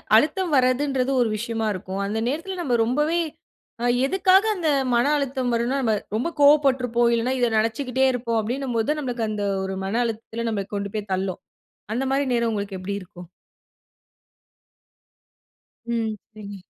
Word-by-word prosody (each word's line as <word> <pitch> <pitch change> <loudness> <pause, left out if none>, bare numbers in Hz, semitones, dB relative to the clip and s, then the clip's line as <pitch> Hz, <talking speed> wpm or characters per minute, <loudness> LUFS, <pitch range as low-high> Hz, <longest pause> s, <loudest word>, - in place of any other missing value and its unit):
அழுத்தம் 310 +8 +2
வரதுன்றது 260 0 +2
ஒரு 230 - +2
விஷயமா 225 -1 -2
இருக்கும். 190 +1 -5
அந்த 210 +2 -2
நேரத்தில 335 +7 -3
நம்ப 255 -7 +1
ரொம்பவே 300 +7 +1 0.6
அ - - +1 0.2
எதுக்காக 380 +5 +4
அந்த 345 -5 -2 0.3
மன 235 - +3
அழுத்தம் 265 -3 -1
வருன்னா 240 +4 0
நம்ம 220 -3 +2 0.2
ரொம்ப 240 +9 0
கோவப்பட்டுருப்போம். 260 -5 +4
இல்லன்னா 235 +3 +1
இத 245 - +3
நினைச்சிக்கிட்டே 250 +4 +1
இருப்போம், 235 -2 -1
அப்பிடினும்போது 245 +3 -1
நம்மளுக்கு 240 -5 -2
அந்த 210 -1 -3 0.2
ஒரு 190 0 -3
மன 220 +5 0
அழுத்தத்தில 230 +1 -4
நம்மள 200 -3 -2
கொண்டு 200 0 -3
போய் 210 -1 -4
தள்ளும். 190 -1 -2 0.5
அந்தமாரி 270 +3 0
நேரம் 235 -1 +1
உங்களுக்கு 200 -2 -3
எப்படி 200 +2 -4
இருக்கும்? 180 -1 -12 2.7
ம். 225 -2 -1 0.2
சரி. 205 -1 -9
235 Hz, 140 wpm, -24 LUFS, 215-275 Hz, 2.7 s, எதுக்காக